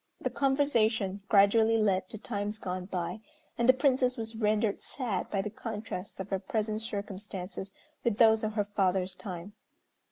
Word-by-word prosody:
The - - -2
conversation 230 -8 +2
gradually 220 +2 +5
led 195 -4 +1
to - - -7
times 210 -1 -3
gone 185 -3 -4
by, 180 +1 -3 0.4
and 235 +1 +1
the - - +10
Princess 260 -1 +2
was 225 0 -4
rendered 215 -1 +1
sad 240 -8 -2
by 195 -2 0
the 210 - -4
contrast 210 -4 -6
of 190 +1 -5
her 195 - +1
present 215 -2 -2
circumstances 200 -2 -5 0.3
with 230 -3 +1
those 220 -1 +6
of 215 0 -1
her 210 -2 0
father's 190 -2 0
time. 180 +1 -7
210 Hz, 160 wpm, -30 LUFS, 195-225 Hz, 0.4 s, the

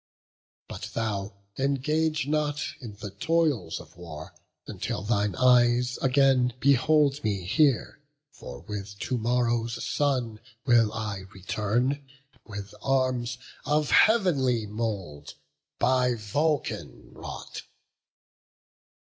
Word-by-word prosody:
But - - -7
thou, 105 -3 -2 0.2
engage 150 +3 +1
not 150 -1 0 0.2
in 115 -5 -8
the 100 -1 -7
toils 155 - 0
of - - -14
war, 80 -3 -9 0.3
Until 90 - -4
thine 105 -3 0
eyes 125 0 +4
again 130 -2 +3
behold 140 +2 +3
me 100 -4 -1
here; 120 - +2 0.3
For - - -10
with 100 -1 -7
to 125 +3 -2
morrow's 120 0 0
sun 125 -7 0 0.3
will 120 -4 +4
I 105 -4 -4
return 115 +9 -1 0.4
With 100 -2 -7
arms 130 -2 0 0.3
of 150 +1 +1
heav'nly 140 - +4
mould, 100 -9 -5 0.4
by 125 -1 +2
Vulcan 145 +8 -2
wrought." - - -8
120 Hz, 100 wpm, -27 LUFS, 105-140 Hz, 0.4 s, eyes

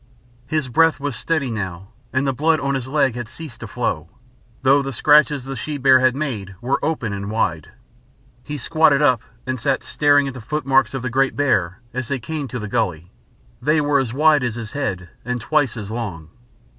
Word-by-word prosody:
His 155 0 -1
breath 160 +6 +3
was 140 -3 -3
steady 155 -6 -1
now, 95 -3 -5 0.2
and 130 +1 0
the 135 - +1
blood 155 +4 +2
on 140 0 -1
his 130 -2 -3
leg 135 -2 +2
had 120 -1 -5
ceased 155 -7 -10
to 115 - -7
flow, 120 +1 -2 0.5
though 135 +2 +5
the 135 0 -4
scratches 150 +2 +4
the 135 +1 -6
she 145 +5 -4
bear 130 -1 +6
had 130 0 +3
made 110 -10 -4
were 125 +5 -1
open 145 -9 -1
and 100 0 -4
wide. 90 -8 -1 0.7
He 150 0 -5
squatted 150 +1 +3
up 130 -6 +4 0.2
and 130 0 -2
sat 135 +4 0
staring 145 -1 +3
at 135 - -4
the 125 - -8
footmarks 135 -1 +1
of 130 - -4
the 130 - -2
great 135 +1 +2
bear 110 -8 +1
as 130 -1 -3
they 140 - -1
came 145 +3 -4
to 125 - -5
the 105 -2 -5
gully 85 -4 -2 0.5
they 150 +5 +3
were 145 -1 +2
as 130 -4 -1
wide 150 +1 +4
as 120 -2 -1
his 115 -3 -6
head 95 -11 -3 0.2
and 125 +1 -2
twice 135 0 +1
as 105 -1 -6
long. 95 -10 -5
130 Hz, 205 wpm, -21 LUFS, 115-145 Hz, 0.7 s, bear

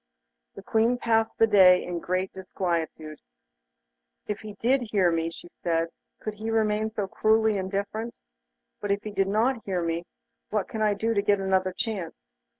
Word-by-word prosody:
The - - -10
Queen 230 +2 +2
passed 225 -2 +1
the 225 - +6
day 185 -4 +6
in 175 -1 -4
great 185 +2 -2
disquietude. 170 -5 -3 1.1
'If 210 -1 -3
he 215 -1 -8
did 250 +6 +2
hear 190 -5 +3
me,' 165 0 0
she 165 - -11
said, 165 -1 0 0.3
'could 215 - -4
he 215 +2 -5
remain 220 -1 +1
so 215 -2 -2
cruelly 220 +2 +2
indifferent? 200 +4 -3 0.6
But 205 - -4
if 200 0 0
he 215 - -5
did 195 -1 +1
not 225 +4 +1
hear 185 -3 -1
me, 165 +1 -2 0.4
what 210 -2 -1
can 220 - -5
I 210 -1 +3
do 225 +3 0
to 200 - +2
get 205 0 +2
another 190 -1 +1
chance? 195 -4 -4
200 Hz, 170 wpm, -27 LUFS, 185-220 Hz, 1.1 s, the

